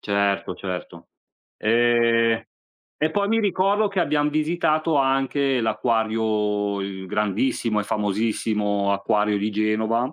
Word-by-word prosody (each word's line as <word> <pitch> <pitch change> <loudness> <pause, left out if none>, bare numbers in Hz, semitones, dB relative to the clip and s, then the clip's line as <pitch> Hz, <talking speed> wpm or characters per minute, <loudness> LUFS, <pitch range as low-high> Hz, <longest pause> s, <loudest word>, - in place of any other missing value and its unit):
certo, 100 -1 0
certo. 90 -2 -7 0.5
Ehm, 115 0 +2 0.5
e 155 +1 0
poi 200 +2 0
mi 225 +1 +2
ricordo 200 +1 +1
che 195 -2 -1
abbiam 150 -2 +1
visitato 155 0 0
anche 135 0 +1
l'acquario, 110 -2 0
il 95 -1 -6
grandissimo 105 +3 -1
e - - -4
famosissimo 105 -1 -1
acquario 105 +1 +1
di 105 +2 -1
Genova, 110 +4 0
110 Hz, 115 wpm, -23 LUFS, 105-135 Hz, 0.5 s, Ehm